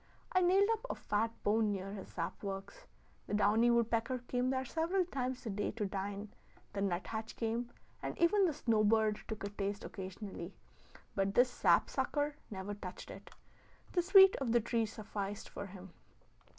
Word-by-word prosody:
I 370 - +3
nailed 380 +3 +5
up 445 0 -1
a - - -1
fat 215 +2 0
bone 215 0 +3
near 195 0 -4
his 195 -2 -7
sap 170 -1 -4
works: 200 - -6 0.4
the - - -1
downy 215 +3 +4
woodpecker 235 +1 +2
came 250 0 0
there 260 0 0
several 340 +6 +1
times 255 -6 -3
a 220 - -2
day 205 +1 -1
to 210 -1 -2
dine; 200 +1 -4 0.4
the 200 - -2
nut 185 -2 0
hatch 220 0 -5
came, 235 +1 -2 0.3
and - - -4
even 380 +4 +4
the - - +1
snow 230 -7 +2
bird 215 0 +3
took 220 -2 -5
a 200 - -2
taste 200 0 -3
occasionally; 190 -1 -7 0.6
but 195 0 0
this 245 +1 +5
sap - - +4
sucker 290 0 -1
never 195 0 -5
touched 190 -3 -8
it; - - -11 0.6
the 355 - +2
sweet 385 +1 +8
of 250 -4 -1
the 240 - +6
tree 230 0 0
sufficed 205 -1 -5
for 200 - -6
him. 190 -1 -11
220 Hz, 175 wpm, -34 LUFS, 200-255 Hz, 0.6 s, sweet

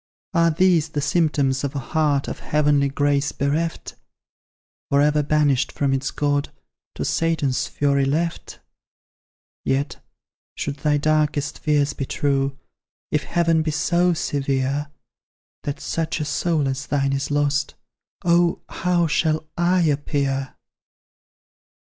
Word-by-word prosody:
Are 170 -1 +4
THESE 165 -1 +3
the 150 - -3
symptoms 145 -4 +1
of 140 0 -3
a 135 -3 -5
heart 150 -3 +2
Of - - -5
heavenly 145 -2 +2
grace 145 +1 +1
bereft 155 +4 -2 1.0
For 140 - +3
ever 150 +1 +3
banished 145 -3 +2
from 140 -2 0
its 135 -1 -1
God, 145 -1 -1 0.4
To - - -3
Satan's 160 -6 0
fury 140 -1 +1
left? 165 +5 -2 1.0
Yet, 135 +2 -1 0.5
should 145 0 -4
thy 150 0 +1
darkest 150 -1 0
fears 145 -2 +1
be 135 - -4
true, 135 -1 0 0.5
If 150 - 0
Heaven 165 -2 +2
be 155 - -1
so 175 +4 +2
severe, 140 -1 -1 0.8
That 145 - -3
such 165 -1 -2
a 150 - -2
soul 155 -1 0
as 135 +1 -3
thine 140 -1 +1
is 135 0 -2
lost, 145 0 0 0.5
Oh! 170 0 +3
how 180 -1 +1
shall 155 0 +1
I 175 +1 +2
appear? 140 -3 -1
145 Hz, 125 wpm, -22 LUFS, 140-160 Hz, 1.0 s, Are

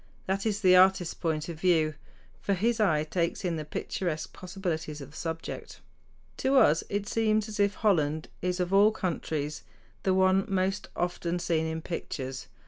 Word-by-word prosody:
That 195 +3 -1
is 210 0 -1
the 185 -2 +6
artist's 185 -2 +5
point 160 -3 -2
of 165 -2 -6
view; 160 -3 +3 0.5
for 200 - +1
his 225 +5 +1
eye 155 -8 +3
takes 170 +4 -1
in 175 -2 0
the 155 - -3
picturesque 155 +1 -3
possibilities 175 -5 -4
of 140 0 -9
the - - -16
subject. 165 0 -5 0.6
To 270 +1 +2
us 165 - +5
it 205 0 -2
seems 215 -1 +1
as 210 -1 -7
if 200 0 +3
Holland 155 -7 +1
is 180 +1 -1
of 180 +1 -1
all 200 +2 +7
countries 160 -7 -3 0.4
the 190 -1 +2
one 190 +1 +4
most 195 +1 0
often 175 0 -1
seen 165 -2 0
in 160 0 -4
pictures. 135 -6 -5
180 Hz, 170 wpm, -29 LUFS, 160-195 Hz, 0.6 s, all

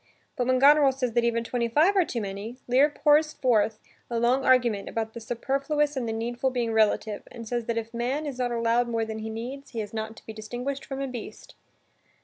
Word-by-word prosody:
But 250 -4 -1
when 255 0 +3
Goneril 285 +1 +6
says 250 -3 -2
that 240 0 +2
even 230 0 +1
twenty 235 0 -1
five 310 - +3
are 380 - +5
too 240 -8 -4
many, 205 +4 -6
Lear 260 +4 +5
pours 305 +1 +3
forth 220 -4 +1 0.3
a 235 -1 -1
long 250 +3 +2
argument 240 -6 +3
about 220 -1 -3
the - - -7
superfluous 275 +6 -1
and 245 -4 -2
the - - -1
needful 240 +3 -1
being 240 -3 -1
relative 215 -1 +2
and 230 -2 -9
says 240 0 -2
that 230 0 -2
if 230 +1 -4
man 255 +6 -1
is 275 -3 -5
not 245 -1 0
allowed 235 +1 +1
more 230 -1 -1
than 220 0 -5
he 220 0 -5
needs, 250 +5 -7
he 230 - -3
is 210 -1 -5
not 220 0 -4
to - - -16
be 220 - -7
distinguished 245 +6 -5
from 270 -1 -5
a 275 - -2
beast. 245 -4 -8
240 Hz, 225 wpm, -26 LUFS, 225-270 Hz, 0.3 s, Goneril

